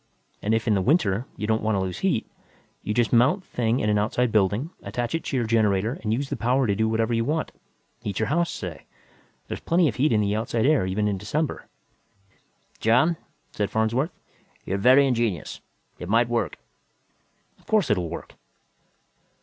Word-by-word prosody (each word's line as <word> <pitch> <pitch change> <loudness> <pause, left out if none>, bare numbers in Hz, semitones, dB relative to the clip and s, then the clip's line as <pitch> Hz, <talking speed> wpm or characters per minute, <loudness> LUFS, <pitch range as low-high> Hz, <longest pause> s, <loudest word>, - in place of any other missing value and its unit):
And 110 +2 +1
if, 115 +1 -2
in 110 - +4
the 100 - +2
winter, 120 - +1
you 105 - -3
don't 110 +1 +1
want 110 -1 0
to - - +1
lose 95 -1 -3
heat, 190 - 0 0.6
you - - -4
just 115 +2 +1
mount 125 - +4
the - - -30
thing 120 +1 0
in 105 - 0
an 105 -1 +2
outside 120 +3 0
building, 105 - +1
attach 120 -1 -3
it 165 - -1
to 135 - -1
your 120 - 0
generator 110 +1 +1
and 105 - -2
use 135 +5 -1
the - - -2
power 125 +3 +1
to 100 - +1
do 110 +2 +1
whatever 115 +1 0
you 115 0 +1
want 155 +5 -1 0.5
heat 100 -2 -4
your 110 - 0
house, 170 +3 +1
say. 90 -5 -6 0.6
There's - - -5
plenty 170 0 +2
of 120 - -2
heat 145 +4 +2
in 110 - +3
the 100 0 0
outside 115 +1 -1
air 140 -10 +3
even 105 +3 0
in 100 -2 -1
December." 140 +10 -2 1.1
"John," 125 +10 +3 0.4
said 105 -1 -2
Farnsworth, 115 +7 0 0.6
"you - - -3
are - - +1
very 130 +6 +6
ingenious. 115 - -1 0.4
It 90 - -7
might 115 +3 +3
work." 120 -1 -1 1.0
"Of - - -27
course 210 - +2
it'll 90 -5 0
work." 85 - -8
115 Hz, 195 wpm, -25 LUFS, 105-130 Hz, 1.1 s, very